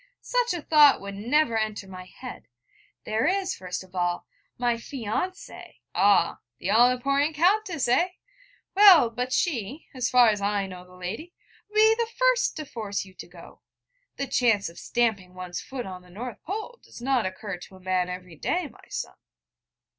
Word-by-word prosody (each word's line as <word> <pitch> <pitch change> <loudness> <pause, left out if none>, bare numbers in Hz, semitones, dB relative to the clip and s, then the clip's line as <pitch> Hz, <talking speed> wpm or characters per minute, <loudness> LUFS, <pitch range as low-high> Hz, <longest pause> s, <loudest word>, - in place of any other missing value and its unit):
'Such - - 0
a 335 - -5
thought 300 -3 +6
would 200 0 -7
never 235 +5 +1
enter 215 -2 -2
my 185 -1 -9
head: 250 +7 -10 0.6
there 220 +5 +1
is, 380 0 0
first 180 0 -5
of 185 0 -19
all, 175 -1 -1 0.3
my 245 -1 +2
fiancée 245 - -5
' - - -56
'Ah, 190 -2 +3 0.2
the 190 - -2
all 240 +3 +6
important 275 +5 +1
Countess, 360 - +2
eh? 340 +9 +3 0.7
Well, 375 - +8
but 250 +2 -3
she, 270 - -1
as 255 -2 -1
far 245 -2 +6
as 210 -2 0
I 200 0 0
know 180 -1 -9
the 180 - -16
lady, 215 - -6 0.3
would 425 - -19
be 440 +1 +6
the 460 0 -1
first - - +3
to 310 - -5
force 210 -7 -4
you 190 - -15
to - - -10
go. 175 -1 -15 0.5
The 275 - -2
chance 230 -7 +2
of 170 - -12
stamping 205 -7 -1
one's 180 -1 -5
foot 260 -2 -6
on 185 -1 -7
the 180 - -19
North 220 +3 -7
Pole 435 +6 -6
does - - -13
not 250 -4 +1
occur 185 0 -6
to 185 +2 -13
a - - -14
man 185 -1 0
every 180 -2 -7
day, 345 - -1
my - - -19
son.' - - -4
235 Hz, 185 wpm, -26 LUFS, 190-310 Hz, 0.7 s, Well